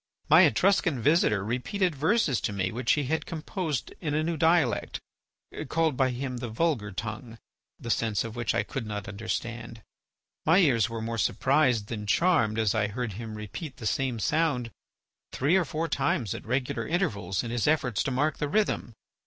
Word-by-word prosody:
My - - +9
Etruscan 175 - +2
visitor 115 - +3
repeated 165 - -1
verses 155 - +1
to - - -1
me 95 -2 -1
which 125 +3 +1
he 150 - 0
had 160 +5 -2
composed 160 -2 -3
in 150 -4 -1
a 155 - +1
new 165 +1 -1
dialect, 160 -5 +2 0.7
called 160 -3 +1
by 130 0 +2
him 125 0 -4
the 120 -1 -5
vulgar 115 -4 0
tongue, 110 +3 -6 0.4
the 115 - -3
sense 110 -4 0
of 115 0 -7
which 120 -4 -1
I - - +2
could 115 +1 -5
not 105 -1 -5
understand. 115 +2 -5 0.6
My 165 +3 +4
ears 125 - +4
were 115 -1 -5
more 115 0 -3
surprised 130 0 +2
than 105 -1 -6
charmed 120 - +2
as 110 -2 +2
I 110 -2 +1
heard 115 +1 -4
him 110 +1 -7
repeat 105 - -7
the 115 - -8
same 130 +1 0
sound 135 -2 0 0.6
three 145 +7 +2
or 185 -3 +3
four 155 +3 -2
times 135 - 0
at - - -8
regular 130 +3 -1
intervals 100 - -1
in 115 - -5
his 120 +1 0
efforts 135 -8 +1
to - - -1
mark 145 +4 0
the 150 - -1
rhythm. 205 - 0
125 Hz, 180 wpm, -27 LUFS, 110-155 Hz, 0.7 s, My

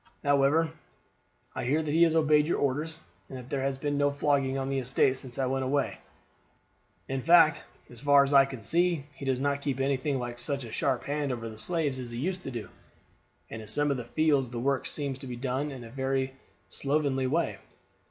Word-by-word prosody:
"However, 145 +3 +3 0.8
I - - -4
hear 150 +5 +1
that 150 - -2
he 165 - +3
has 165 -1 +5
obeyed 150 -1 +4
your - - +1
orders, 150 +4 -1 0.3
and 130 - -7
that 125 0 -11
there 140 - -1
has 135 0 -1
been 145 +1 -1
no 145 0 +4
flogging 140 -2 +1
on 135 0 -2
the 135 0 0
estate 130 +1 +2
since 130 -2 -9
I 135 - +1
went 135 +1 -1
away. 140 +2 -1 1.1
In 135 0 -2
fact, 165 0 +6 0.3
as 120 -1 -8
far 140 0 +6
as 140 +1 -1
I 135 -1 +8
can 130 -4 -8
see, 170 - +1
he 140 - -9
does 130 -1 0
not 140 +1 0
keep 140 -2 -2
anything 135 +1 0
like 120 -1 -5
such 140 +2 -3
a 115 - -8
sharp 130 +2 0
hand 145 -1 -2
over 115 -2 -4
the 110 - -8
slaves 150 -3 -1
as 125 -2 -6
he 120 - -6
used 185 +8 -2
to - - -6
do; 115 -7 -6 0.8
and 115 - -6
in 110 - -11
some 145 +4 +1
of 140 - 0
the 125 - -4
fields 140 0 +1
the 120 -1 -5
work 135 +2 0
seems 140 -3 -3
to 135 - -8
be 125 - -5
done 130 +4 -2
in 130 -4 -8
a 115 - -11
very 135 0 -1 0.3
slovenly 140 -2 0
way. 130 -8 0
135 Hz, 220 wpm, -29 LUFS, 130-145 Hz, 1.1 s, I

